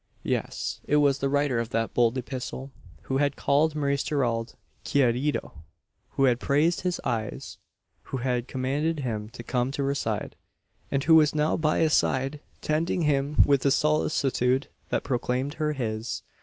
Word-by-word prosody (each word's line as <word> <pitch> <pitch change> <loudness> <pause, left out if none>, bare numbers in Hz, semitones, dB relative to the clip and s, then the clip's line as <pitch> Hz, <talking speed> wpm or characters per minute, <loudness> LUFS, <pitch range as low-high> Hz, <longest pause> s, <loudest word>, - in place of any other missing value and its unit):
Yes; - - -2
it 150 - +2
was 140 -2 +3
the 135 - 0
writer 140 -3 +1
of 115 -1 -2
that 115 -2 -1
bold 120 +1 +2
epistle, 130 +1 -5 0.3
who 135 - -1
had 140 0 +1
called 150 +2 +2
Maurice 140 -1 0
Gerald 120 -6 -1 0.3
"querido;" 135 +1 +1 0.6
who 135 - +1
had 125 -3 +4
praised 150 +6 +2
his 180 -1 -1
eyes 110 -2 -4 0.5
who - - -4
had 125 -1 -1
commanded 145 +5 -1
him 110 -4 -3
to 120 +1 -10
come 125 +1 0
to 140 +1 -2
her 140 0 +1
side; 110 -6 -3 0.5
and 135 -1 0
who 165 - +5
was 155 -2 +6
now 150 +1 +2
by 155 -1 +1
his 160 -2 +3
side, 135 +3 +1 0.2
tending 165 +3 0
him 145 0 +3
with 140 -2 +3
a 140 - +4
solicitude 135 -3 +1 0.2
that - - 0
proclaimed 130 +2 -1
her 150 0 +1
his! 115 -4 -3
135 Hz, 165 wpm, -26 LUFS, 125-150 Hz, 0.6 s, was